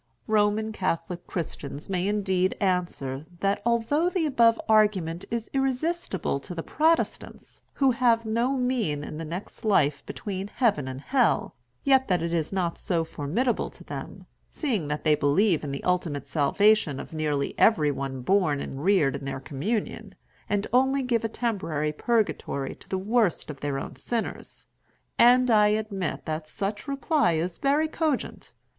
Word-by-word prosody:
Roman 215 Hz, 0 st, +2 dB
Catholic 175 Hz, -3 st, -3 dB
Christians 145 Hz, -4 st, -5 dB
may 185 Hz, -1 st, -1 dB
indeed 190 Hz, -3 st, 0 dB
answer 170 Hz, -7 st, -1 dB
that, 200 Hz, 0 st, +1 dB
although 235 Hz, +9 st, +2 dB
the 360 Hz, -3 st, 0 dB
above 235 Hz, -5 st, +4 dB
argument 200 Hz, -6 st, +2 dB
is 230 Hz, -1 st, -3 dB
irresistible 270 Hz, -, -1 dB
to 175 Hz, +6 st, -8 dB
the 165 Hz, -, -4 dB
Protestants, 320 Hz, +2 st, -1 dB
who 270 Hz, -2 st, +3 dB
have 235 Hz, -2 st, +2 dB
no 235 Hz, +4 st, +1 dB
mean 235 Hz, -, 0 dB
in 155 Hz, +1 st, -7 dB
the -, -, -4 dB
next 170 Hz, +5 st, -7 dB
life 150 Hz, -9 st, +2 dB
between 195 Hz, -1 st, -5 dB
Heaven 205 Hz, -, +1 dB
and 130 Hz, +1 st, -6 dB
Hell, 255 Hz, -, +1 dB, 0.3 s
yet 265 Hz, -1 st, +4 dB
that 180 Hz, -4 st, +1 dB
it 170 Hz, 0 st, -2 dB
is 160 Hz, -2 st, -1 dB
not 180 Hz, -3 st, -1 dB
so 170 Hz, -3 st, 0 dB
formidable 165 Hz, -, -1 dB
to -, -, -15 dB
them, -, -, -8 dB, 0.3 s
seeing 225 Hz, -, -1 dB
that 150 Hz, 0 st, -3 dB
they 155 Hz, -, +4 dB
believe 155 Hz, +5 st, +2 dB
in 145 Hz, -, -4 dB
the 140 Hz, -, -5 dB
ultimate 170 Hz, -6 st, -1 dB
salvation 165 Hz, 0 st, +2 dB
of -, -, -9 dB
nearly 150 Hz, -3 st, -1 dB
every 155 Hz, -10 st, +4 dB
one 135 Hz, -2 st, -4 dB
born 180 Hz, -4 st, +2 dB
and 135 Hz, 0 st, -6 dB
reared 160 Hz, -8 st, +3 dB
in 135 Hz, -, -9 dB
their 135 Hz, -1 st, -4 dB
communion, 155 Hz, -, -3 dB, 0.3 s
and 205 Hz, 0 st, 0 dB
only 265 Hz, +2 st, +3 dB
give 235 Hz, -3 st, 0 dB
a 225 Hz, -, -1 dB
temporary 165 Hz, -11 st, -2 dB
purgatory 155 Hz, -, -1 dB
to -, -, -19 dB
the 190 Hz, -, -1 dB
worst 205 Hz, -4 st, +1 dB
of 140 Hz, -, -11 dB
their 145 Hz, -1 st, -2 dB
own -, -, -6 dB
sinners. 235 Hz, -2 st, -4 dB, 0.5 s
And 250 Hz, +1 st, +6 dB
I 210 Hz, -1 st, +6 dB
admit 210 Hz, -3 st, -2 dB
that 155 Hz, -1 st, -4 dB
such 205 Hz, -, -4 dB
reply 280 Hz, -, +1 dB
is 170 Hz, +2 st, -2 dB
very 290 Hz, +3 st, +2 dB
cogent. 310 Hz, -3 st, -2 dB
195 Hz, 160 wpm, -26 LUFS, 155-235 Hz, 0.5 s, And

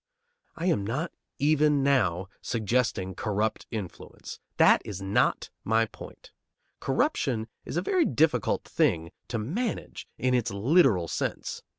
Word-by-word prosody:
I 170 Hz, -, -4 dB
am 165 Hz, -, +2 dB
not 130 Hz, -, -2 dB, 0.3 s
even 150 Hz, -1 st, +3 dB
now 95 Hz, -10 st, +2 dB
suggesting 110 Hz, -4 st, 0 dB
corrupt 105 Hz, 0 st, -2 dB
influence. 105 Hz, -6 st, -7 dB, 0.2 s
That -, -, +6 dB
is 100 Hz, -2 st, -6 dB
not 95 Hz, +1 st, +1 dB
my 115 Hz, +1 st, +3 dB
point. -, -, -13 dB, 0.5 s
Corruption 110 Hz, -4 st, 0 dB, 0.2 s
is -, -, -4 dB
a 175 Hz, -, 0 dB
very 360 Hz, -, +2 dB
difficult 150 Hz, -, +2 dB
thing 80 Hz, 0 st, 0 dB, 0.2 s
to 120 Hz, -, -2 dB
manage 190 Hz, -, -3 dB
in 130 Hz, 0 st, +1 dB
its 125 Hz, -3 st, +1 dB
literal 105 Hz, -, +3 dB
sense. 70 Hz, -, -3 dB
115 Hz, 125 wpm, -27 LUFS, 100-145 Hz, 0.5 s, That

